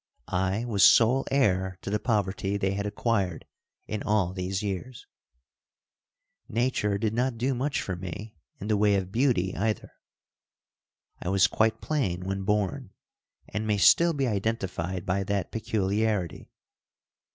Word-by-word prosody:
I 95 +5 0
was 105 -5 +2
sole 125 +4 +6
heir 95 -9 +1
to - - -4
the 105 - +1
poverty 100 -3 0
they 95 -1 0
had 100 +1 -2
acquired 100 -4 -1 0.4
in 105 -1 -4
all 105 -4 +1
these 95 +1 -3
years. 105 +5 -5 1.4
Nature 115 -3 0
did 105 +1 -1
not 125 +1 0
do 130 +4 0
much 135 +3 -1
for 95 - -3
me 95 +4 -7 0.2
in 100 - -6
the 110 -1 +2
way 105 0 +4
of 95 -1 -2
beauty, 115 -6 +1
either. 110 +3 -2 1.3
I - - -3
was 95 0 +4
quite 110 0 +1
plain 95 - -1
when 95 0 -2
born 105 -3 -1 0.5
and 105 +2 -3
may 105 -1 +2
still 170 - +5
be 140 -3 0
identified 95 -5 -2
by 95 +1 0
that 100 -2 -2
peculiarity. 105 -4 -1
105 Hz, 140 wpm, -27 LUFS, 95-115 Hz, 1.4 s, sole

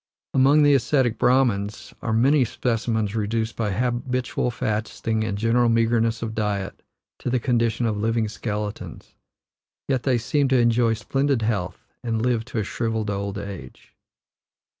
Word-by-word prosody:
Among 140 +3 +5
the 145 0 +5
aesthetic 130 -3 +2
Brahmans 120 -5 +1
are 115 - -2
many 130 +6 +4
specimens 115 -3 -1
reduced 110 +1 -1
by 110 -2 -1
habitual 125 +3 -1
fasting 110 0 -2
and 100 -2 -2
general 115 +2 +2
meagreness 115 0 +1
of 110 -1 -4
diet 100 -3 -3 0.4
to - - -3
the 125 0 +1
condition 120 -1 +1
of 110 -2 0
living 110 +1 0
skeletons; 105 -1 -5 0.7
yet 130 -3 +1
they 130 -1 +2
seem 140 +5 +1
to 130 -1 +3
enjoy 115 -1 +3
splendid 135 +1 0
health, 95 -5 -2 0.2
and 115 -2 -1
live 120 -3 0
to 125 - -7
a 110 - +1
shrivelled 110 0 -2
old 100 0 -3
age. 100 -10 -9
115 Hz, 145 wpm, -23 LUFS, 105-125 Hz, 0.7 s, Among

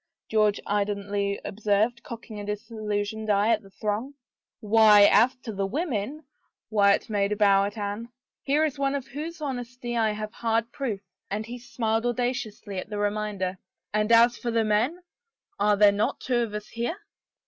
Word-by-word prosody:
George 215 -2 +3
indolently 200 0 -1
observed, 215 +3 0
cocking 230 -3 -8
a - - -5
dis 210 +2 -5
illusioned 215 0 -3
eye 205 +1 +3
at 225 -2 +3
the 195 - -16
throng. 215 +7 -3 0.3
" - - -67
Why 215 -1 +6
as 240 +5 +5
to 225 - -5
the 195 0 -1
women 275 - -3 0.2
" - - -44
— - - -67
Wyatt 200 -2 +3
made 205 -2 0
a - - -2
bow 200 -1 +4
at 205 +2 -5
Anne 205 +3 -4 0.2
— - - -67
"here 295 +3 +3
is 290 -2 -3
one 275 0 +1
of 275 -2 -3
whose 310 +6 -7
honesty 245 -3 -4
I 220 -2 +2
have 215 +1 -5
hard 230 0 0
proof" 230 -8 -3 0.2
— - - -53
and 210 +2 -3
he 240 +2 -7
smiled 230 -1 -1
audaciously 235 -5 -2
at 195 - -7
the 210 - -4
reminder 205 -3 -2 0.2
— - - -55
and 210 +1 +1
as 235 +1 +6
for 240 - -3
the 230 -1 +2
man, 235 +12 0 0.6
are 210 0 +3
there 205 0 +7
not 205 +2 -1
two 250 -2 0
of 225 -3 -2
us 210 0 -6
here? 240 +10 -3
215 Hz, 195 wpm, -26 LUFS, 205-240 Hz, 0.6 s, there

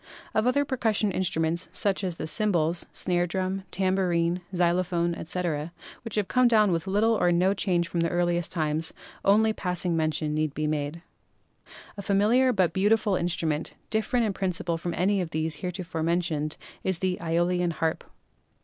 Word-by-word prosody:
Of 220 +2 +2
other 285 +3 +2
percussion 220 -6 0
instruments, 170 -2 0
such 200 -1 +1
as 180 -3 -2
the - - -4
cymbals, 170 -2 +1
snare 175 -1 0
drum, 190 +2 -2
tambourine, 180 -2 +1
xylophone, 175 0 +1
etc., 165 -2 -2 0.3
which 230 -2 -5
have 210 -3 0
come 250 -1 +4
down 215 -4 +4
with 165 +2 -1
little 210 +4 +3
or 175 -5 +2
no 180 +3 +3
change 180 -3 0
from 170 0 -3
the 170 0 +1
earliest 175 -1 0
times, 155 -1 -1 0.3
onl^ 220 +2 +4
passing 180 -2 -1
mention 155 -1 0
need 155 -1 -1
be 155 - -1
made. 150 +2 -2 0.9
A - - -4
familiar 215 +7 +3
but 190 -7 +2
very 190 +4 -3
beautiful 210 -1 +3
instrument, 165 -3 -1 0.2
different 225 +2 +1
sm 210 - 0
principle 180 -3 -1
from 175 +1 -3
any 195 +2 +2
of 175 - -3
those 160 0 -2
heretofore 180 -3 -4
mentioned, 160 -2 -1 0.3
is 190 -2 +1
the 185 0 -1
^Eolian 175 +1 +1
harp. 160 0 -1
180 Hz, 165 wpm, -27 LUFS, 165-195 Hz, 0.9 s, come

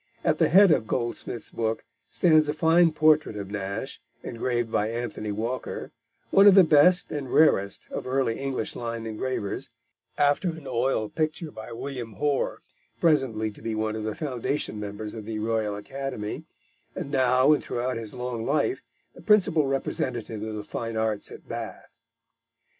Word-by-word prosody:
At - - +1
the - - +4
head 195 +2 +7
of 110 -7 +2
Goldsmith's 120 -1 -3
book 110 -1 -2 0.2
stands 155 -3 +4
a 150 - -1
fine 165 +1 +4
portrait 155 -6 +3
of 100 -1 -6
Nash, 105 +5 -4 0.2
engraved 120 -1 -2
by 105 0 +1
Anthony 115 -2 -4
Walker, 115 +5 -4 0.4
one 195 +1 +7
of 200 - +8
the 195 - +9
best 165 +3 +5
and 140 -4 -4
rarest 100 -11 +3
of - - -5
early 130 -3 0
English 135 -4 -3
line 115 -1 -4
engravers, 110 +1 -3 0.5
after 145 +5 +2
an 160 -3 -7
oil 125 -3 0
picture 155 +4 -2
by 110 +2 -9
William 120 -2 -6
Hoare, 145 +3 -1 0.4
presently 125 -9 +2
to - - -16
be 115 -1 -3
one 110 0 -1
of 110 - -4
the 110 0 -3
foundation 140 -5 -2
members 105 +1 -6
of 110 -2 -7
the 110 0 -4
Royal 110 -1 -1
Academy, 125 0 -5 0.5
and 140 - -5
now 130 +1 +4
and 150 - +1
throughout 125 +2 -2
his 115 -2 -6
long 125 -2 -4
life 155 - 0 0.3
the - - -14
principal 180 -8 +3
representative 120 -5 -2
of 110 0 -4
the 105 - -5
fine 115 +1 -4
arts 110 -2 -1
at - - -12
Bath. 115 0 -7
120 Hz, 165 wpm, -26 LUFS, 110-145 Hz, 0.5 s, the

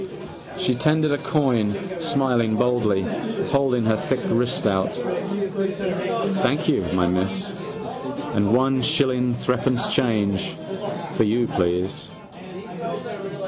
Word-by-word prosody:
She 185 -8 +1
tendered 155 +3 +2
a 145 - +1
coin, 125 - +1 0.2
smiling 130 -8 +1
boldly, 110 -5 +2 0.5
holding 135 -5 +2
her 110 0 +3
thick 130 +3 -1
wrist 120 +1 +1
out. 95 -2 +2
—Thank 195 - -1
you, 155 - +2
my 90 -1 +2
miss. 90 +2 -1 0.8
And 100 0 +2
one 130 +2 +3
shilling 130 -4 +2
threepence 125 +1 0
change. 105 -5 +1 0.6
For - - +3
you, 115 +3 +2
please? 90 -2 -1
125 Hz, 100 wpm, -23 LUFS, 110-150 Hz, 0.8 s, her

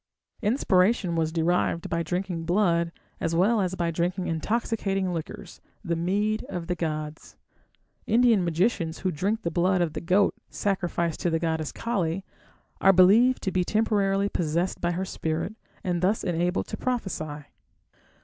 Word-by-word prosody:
Inspiration 200 -4 +2
was 160 -1 0
derived 170 +1 0
by 170 0 -1
drinking 180 -1 -3
blood 170 -2 +2 0.3
as 165 0 -1
well 205 +6 +3
as 185 -1 -1
by 170 -2 -1
drinking 180 +3 -1
intoxicating 195 +1 -1
liquors 170 +3 -7 0.2
the 170 -1 0
mead 205 +6 0
of 175 -3 -4
the 180 - -1
gods. 155 -2 -5 0.7
Indian 230 -3 +4
magicians 170 -1 0
who 185 - +2
drink 200 +8 -1
the 170 - -1
blood 185 +1 +2
of 170 -3 0
the - - -4
goat 190 +4 +3 0.2
sacrificed 175 -4 -1
to 175 - 0
the 165 - +1
goddess 160 -2 -1
Kali, 195 -5 -2 0.6
are 195 - +7
believed 210 +8 +5
to 190 - 0
be 185 -1 +1
temporarily 200 -1 +1
possessed 170 0 -1
by 175 0 0
her 185 +2 -2
spirit, 165 +2 -3 0.3
and 175 -2 -1
thus 195 +4 +1
enabled 175 0 0
to - - -4
prophesy. 160 -12 -3
180 Hz, 150 wpm, -26 LUFS, 170-200 Hz, 0.7 s, are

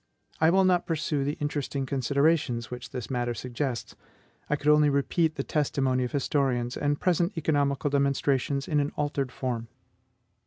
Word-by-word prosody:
I 160 - +5
will 190 +2 +4
not 180 -2 +2
pursue 155 -3 -1
the 145 +2 -2
interesting 145 -2 -2
considerations 135 -2 +1
which 125 0 -7
this 125 -1 -6
matter 120 -1 -1
suggests; 125 +1 -4 0.5
I 150 - +2
could 145 +1 0
only 150 0 +6
repeat 155 +3 +1
the 135 - -2
testimony 135 -4 0
of 125 - -5
historians, 130 -3 0
and 145 0 0
present 175 +1 +1
economical 145 -3 +1
demonstrations 140 0 +1
in 150 -2 +1
an 145 0 0
altered 145 -3 -1
form. 120 -3 -3
140 Hz, 155 wpm, -27 LUFS, 130-150 Hz, 0.5 s, only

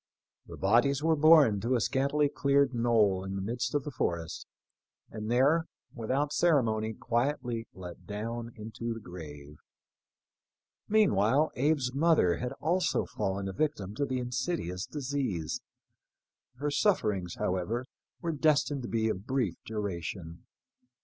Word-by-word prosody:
The - - -9
bodies 120 +8 +3
were 160 0 +3
borne 150 -8 +6
to 120 +4 +1
a - - +2
scantily 140 +5 +1
cleared 140 -1 +2
knoll 110 -5 +2
in 95 0 -5
the 95 - -3
midst 120 +5 -2
of 145 - +1
the 150 - -5
forest, 85 - -3 0.6
and 110 0 -5
there, 140 +7 +3 0.3
without 135 +5 -1
ceremony, 110 -10 +2
quietly 120 0 -1
let 90 -2 -10
down 115 +3 -4
into 115 +2 -5
the - - -7
grave. 75 -7 -10 1.3
Meanwhile 150 - +3
Abe's 135 -2 +1
mother 140 - +3
had 125 0 -3
also 175 +5 0
fallen 95 0 -3
a 95 - -4
victim 105 -7 -2
to 140 +6 -1
the 130 - -1
insidious 125 - -3
disease. 130 - -3 0.9
Her 145 +3 -2
sufferings, 105 - +1
however, 95 +7 -1 0.4
were 170 - -1
destined 145 -2 +2
to 120 - -5
be 110 -1 +1
of 105 0 -3
brief 125 -9 0
duration. 90 -5 -5
120 Hz, 135 wpm, -30 LUFS, 100-140 Hz, 1.3 s, borne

